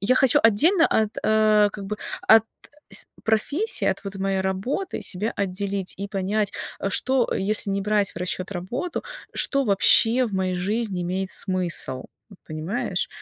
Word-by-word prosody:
я 225 +7 +2
хочу 265 -2 +4
отдельно 320 - +5
от, 215 -1 0
э, 215 -1 +4
как 200 - -7
бы, 210 +2 -4 0.3
от 220 0 +7 0.5
с - - +2 0.2
профессии, 285 - +2
от - - 0
вот 195 0 -6
моей 195 0 -1
работы 195 - -3
себя 210 +3 -1
отделить 195 0 -2
и 200 +1 -4
понять, 200 +1 -1 0.3
э, - - -1
что 260 +4 +1
если 205 +1 0
не 195 0 -1
брать 210 -1 +1
в - - -29
расчёт 180 +1 -3
работу, 235 - -4 0.3
что 275 -1 +2
вообще 225 +4 +4
в 215 - -8
моей 185 -1 -1
жизни 195 +1 -2
имеет 185 +2 -3
смысл, 175 -8 -2 0.3
вот 200 - -15
понимаешь? 180 +6 -3
200 Hz, 160 wpm, -23 LUFS, 190-225 Hz, 0.5 s, от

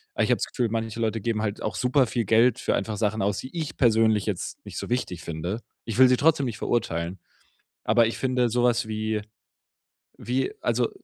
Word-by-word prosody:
Aber - - +2
ich - - 0
habe - - +4
das - - -1
Gefühl, 125 -3 -1
manche 115 0 -3
Leute 110 -1 -1
geben 115 -1 -1
halt 105 -1 -3
auch 110 - -3
super 130 +1 +2
viel 115 0 -1
Geld 115 +3 +4
für - - 0
einfach 110 -2 -2
Sachen 110 0 0
aus, 100 0 0
die 130 +6 -8
ich 160 -3 -4
persönlich 110 -3 +3
jetzt 100 -5 -4
nicht - - -8
so - - -6
wichtig 120 -8 -2
finde. 85 +7 -4 0.2
Ich 115 -1 -4
will 130 - +9
sie 125 - +4
trotzdem 150 -1 +3
nicht 115 - -5
verurteilen, 90 -6 -1 0.7
aber 115 0 +4
ich 115 - -4
finde 125 -2 +1
so 120 +2 +1
was 120 -1 +2
wie 110 0 -2 1.0
wie, 130 +3 -1
also, 120 0 +1
115 Hz, 210 wpm, -25 LUFS, 105-125 Hz, 1.0 s, will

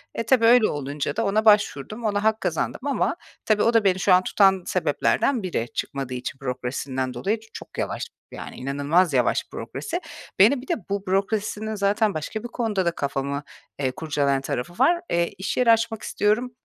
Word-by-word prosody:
E - - -1
tabii, 230 0 +4
öyle 235 -1 +6
olunca 145 0 -3
da, 225 - 0
ona 215 +2 +1
başvurdum, 210 - +2
ona 205 -1 0
hak 220 0 +2
kazandım 170 -4 -2
ama 280 - 0 0.3
tabii 215 -1 +3
o 230 - +3
da 225 -2 +4
beni 190 -2 +2
şu 190 - +4
an 180 0 +5
tutan 190 -1 +3
sebeplerden 255 -6 +1
biri, 175 -11 -1
çıkmadığı 135 -2 -4
için 125 +2 -5
bürokrasisinden 130 0 -3
dolayı, 210 - -1
çok - - -10
yavaş, - - -2 0.3
yani - - -8
inanılmaz 145 +6 +1
yavaş 125 -3 +2
bürokrasi. - - -5 0.4
Beni 240 +7 +6
bir 265 - -13
de, 350 - +1 0.2
bu 200 0 -2
bürokrasinin 210 +3 -1
zaten 205 +1 +1
başka 160 +8 -4
bir - - -4
konuda 225 -6 -1
da 170 - +2
kafamı, 140 -1 -3 0.4
eee, 130 -2 0
kurcalayan 140 -1 0
tarafı 135 +4 -4
var. 335 - +3
Eee, 170 0 +1
iş 190 - -3
yeri 245 -2 +5
açmak 225 -1 +1
istiyorum, 220 +5 0
195 Hz, 180 wpm, -24 LUFS, 140-220 Hz, 0.4 s, öyle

